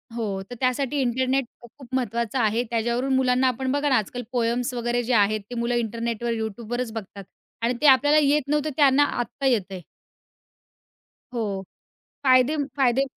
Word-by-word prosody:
हो, 205 Hz, -5 st, -3 dB
तर 245 Hz, -, -7 dB
त्यासाठी 270 Hz, +2 st, 0 dB
इंटरनेट 260 Hz, +2 st, +1 dB
अ, -, -, -39 dB
खूप-खूप 240 Hz, +2 st, -15 dB
महत्त्वाचं 235 Hz, 0 st, -1 dB
आहे. 225 Hz, +1 st, +1 dB
त्याच्यावरून 240 Hz, +3 st, 0 dB
मुलांना 255 Hz, 0 st, +3 dB
आपण 255 Hz, +1 st, -1 dB
बघा 285 Hz, +1 st, +1 dB
ना, 265 Hz, -, +4 dB
आजकाल 245 Hz, +4 st, -3 dB
पोएम्स 245 Hz, +1 st, 0 dB
वगैरे 240 Hz, 0 st, -1 dB
जे 245 Hz, +2 st, -1 dB
आहेत, 215 Hz, -1 st, +3 dB
ते 245 Hz, -, -6 dB
मुलं 235 Hz, +1 st, -1 dB
इंटरनेटवर, 235 Hz, 0 st, -2 dB
YouTubeवरच 225 Hz, +2 st, -4 dB
बघतात 200 Hz, -2 st, -7 dB, 0.4 s
आणि 235 Hz, +2 st, +1 dB
ते 300 Hz, -, +5 dB
आपल्याला 290 Hz, +3 st, +6 dB
येत 295 Hz, +1 st, +3 dB
नव्हतं, 300 Hz, 0 st, +1 dB
त्यांना 285 Hz, -1 st, +5 dB
आत्ता 275 Hz, 0 st, -3 dB
येतंय. 200 Hz, -7 st, 0 dB, 1.5 s
हो. 205 Hz, -5 st, -3 dB, 0.6 s
फायदे 255 Hz, +3 st, +4 dB, 0.2 s
फायदे 265 Hz, -1 st, +3 dB
245 Hz, 155 wpm, -24 LUFS, 230-265 Hz, 1.5 s, आपल्याला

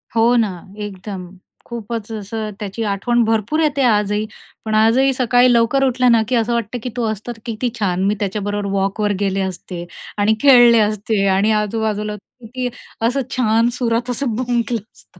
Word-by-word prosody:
हो 230 Hz, +2 st, +4 dB
ना 225 Hz, -4 st, +2 dB, 0.4 s
एकदम. 190 Hz, -2 st, -7 dB, 0.4 s
खूपच 230 Hz, -1 st, -6 dB
असं 215 Hz, 0 st, -4 dB
त्याची 210 Hz, +2 st, -4 dB
आठवण 225 Hz, +4 st, +1 dB
भरपूर 225 Hz, +7 st, 0 dB
येते 295 Hz, -3 st, +1 dB
आजही. 210 Hz, -1 st, +2 dB, 0.4 s
पण 215 Hz, 0 st, -1 dB
आजही 235 Hz, +5 st, +4 dB
सकाळी 250 Hz, 0 st, +3 dB
लवकर 235 Hz, +4 st, +3 dB
उठलं 250 Hz, -1 st, +3 dB
ना, 230 Hz, -1 st, +5 dB
की 250 Hz, -, 0 dB
असं 230 Hz, +1 st, +1 dB
वाटतं 235 Hz, 0 st, -2 dB
की 250 Hz, -, -3 dB
तो 235 Hz, -, 0 dB
असतं, 220 Hz, +3 st, -6 dB
तर 225 Hz, -, -10 dB
किती 235 Hz, +2 st, -2 dB
छान. 185 Hz, -3 st, 0 dB
मी 200 Hz, +2 st, +2 dB
त्याच्याबरोबर 205 Hz, 0 st, -2 dB
वॉकवर 200 Hz, +2 st, 0 dB
गेले 195 Hz, -1 st, 0 dB
असते 180 Hz, -2 st, -5 dB, 0.3 s
आणि 210 Hz, +2 st, +3 dB
खेळले 240 Hz, -4 st, +7 dB
असते 210 Hz, -1 st, 0 dB
आणि 210 Hz, +3 st, +2 dB
आजूबाजूला 210 Hz, 0 st, -2 dB
किती 245 Hz, +4 st, -7 dB, 0.4 s
असं 270 Hz, +3 st, 0 dB, 0.2 s
छान 230 Hz, 0 st, +3 dB
सुरात 240 Hz, 0 st, 0 dB
असं 245 Hz, -2 st, -1 dB
भुंकलं 240 Hz, -1 st, -1 dB
असता. 180 Hz, -, -22 dB
225 Hz, 165 wpm, -19 LUFS, 205-240 Hz, 0.4 s, खेळले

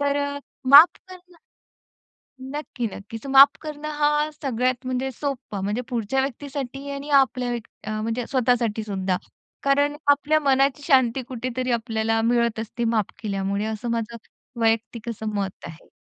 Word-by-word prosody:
तर 285 Hz, 0 st, +1 dB
अ, 285 Hz, 0 st, -4 dB, 0.3 s
माफ 290 Hz, +5 st, +10 dB, 0.2 s
करणं 360 Hz, -1 st, -14 dB, 1.0 s
नक्की, 265 Hz, -2 st, -5 dB
नक्कीच. 215 Hz, +3 st, -8 dB
माफ 275 Hz, +1 st, +7 dB
करणं 305 Hz, -1 st, -6 dB
हा 295 Hz, +1 st, +2 dB
सगळ्यात 255 Hz, -3 st, -2 dB
म्हणजे 255 Hz, +1 st, -1 dB
सोपं. 250 Hz, -7 st, -4 dB
म्हणजे 210 Hz, +4 st, -1 dB
पुढच्या 245 Hz, +1 st, -1 dB
व्यक्तीसाठी 275 Hz, 0 st, -5 dB
आणि 280 Hz, +1 st, -6 dB
आपल्या 265 Hz, -3 st, +3 dB
व्यक 240 Hz, -2 st, -4 dB, 0.2 s
अ, 215 Hz, 0 st, -3 dB
म्हणजे 230 Hz, +2 st, -2 dB
स्वतःसाठी 245 Hz, -4 st, +1 dB
सुद्धा. 190 Hz, -3 st, -1 dB, 0.5 s
कारण 285 Hz, +1 st, +2 dB
आपल्या 290 Hz, +2 st, +3 dB
मनाची 275 Hz, 0 st, +2 dB
शांती 260 Hz, -4 st, +3 dB
कुठेतरी 255 Hz, 0 st, -3 dB
आपल्याला 225 Hz, -1 st, 0 dB
मिळत 235 Hz, -1 st, +1 dB
असते 230 Hz, +2 st, -4 dB
माफ 215 Hz, -3 st, 0 dB
केल्यामुळे, 200 Hz, -1 st, -2 dB
असं 220 Hz, +2 st, -4 dB
माझं 230 Hz, 0 st, -2 dB, 0.4 s
वैयक्तिक 225 Hz, +1 st, 0 dB
असं 220 Hz, -1 st, -5 dB
मत 195 Hz, -2 st, -4 dB
आहे. 165 Hz, 0 st, -12 dB
250 Hz, 140 wpm, -24 LUFS, 225-280 Hz, 1.0 s, माफ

